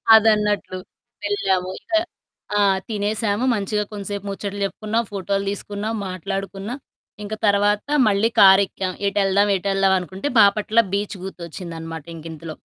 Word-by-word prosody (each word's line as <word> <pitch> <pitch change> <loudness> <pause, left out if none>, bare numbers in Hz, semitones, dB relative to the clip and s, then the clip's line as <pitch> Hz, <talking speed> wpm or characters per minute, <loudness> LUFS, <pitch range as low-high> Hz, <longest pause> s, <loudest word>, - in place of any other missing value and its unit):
అదన్నట్లు. 210 -3 +2 0.5
వెళ్ళాము. 190 -3 0
ఇక - - -22 0.7
ఆ! - - +4 0.3
తినేసాము. 210 +2 -1
మంచిగా 210 +1 -1
కొంచసేపు 200 0 -5
ముచ్చట 200 0 -4
చెప్పుకున్నాం. 215 +3 -1
ఫోటోలు 195 0 -2
తీసుకున్నాం, 205 +2 -4 0.2
మాట్లాడుకున్నా. 195 +4 -4 0.5
ఇంక 210 +1 -5
తర్వాత 205 +3 +2 0.2
మళ్ళీ 210 +2 +3
కారెక్కాం. 190 -1 +5 0.2
ఏటెళ్దాం? 200 0 +2
ఏటెళ్దాం? 195 0 +2
అనుకుంటే 190 +8 -5
బాపట్ల 210 +3 +4
బీచ్ 200 0 -2
గుర్తొచ్చిందనమాట 165 -3 -7
ఇంకింతలో. 160 0 -8
200 Hz, 110 wpm, -22 LUFS, 190-210 Hz, 0.7 s, కారెక్కాం